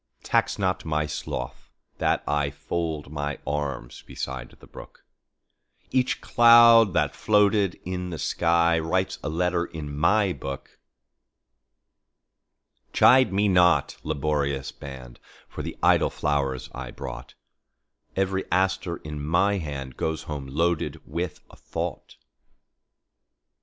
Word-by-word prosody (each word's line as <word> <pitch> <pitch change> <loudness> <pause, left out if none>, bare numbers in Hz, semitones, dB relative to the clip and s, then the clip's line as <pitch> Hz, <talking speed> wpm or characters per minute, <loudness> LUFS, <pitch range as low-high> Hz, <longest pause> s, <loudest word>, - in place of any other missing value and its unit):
Tax - - +1
not 95 -2 -1
my 75 -1 -1
sloth 75 -4 -6 0.3
that - - +1
IFold 75 +1 -2
my 75 -1 -3
arms 70 -4 -4
beside 65 -2 -6
the - - -15
brook; - - -14 0.9
Each 130 -1 +1
cloud 115 -3 +7
that - - +1
floated 105 -3 +2
in 90 0 -4
the 85 - -5
skyWrites 85 +2 +1
a - - -2
letter 85 +2 0
in 75 -4 -7
my 95 +5 +2
book. 70 -4 -8 2.1
Chide 130 -2 +6
me 100 +2 +2
not, 90 -2 +3
laborious 70 -2 -1
band, 65 -3 -10 0.3
For - - -7
the - - -6
idle - - +4
flowers 70 -4 -1
I 65 -1 -6
brought; 60 -2 -8 0.8
Every 95 0 0
aster 95 -1 0
in 75 -1 -7
my 95 +6 +2
handGoes 75 0 -4
home 70 -3 -6
loaded 85 +5 -1
with 85 +3 -4
a - - -15
thought. - - -6
80 Hz, 110 wpm, -25 LUFS, 70-95 Hz, 2.1 s, cloud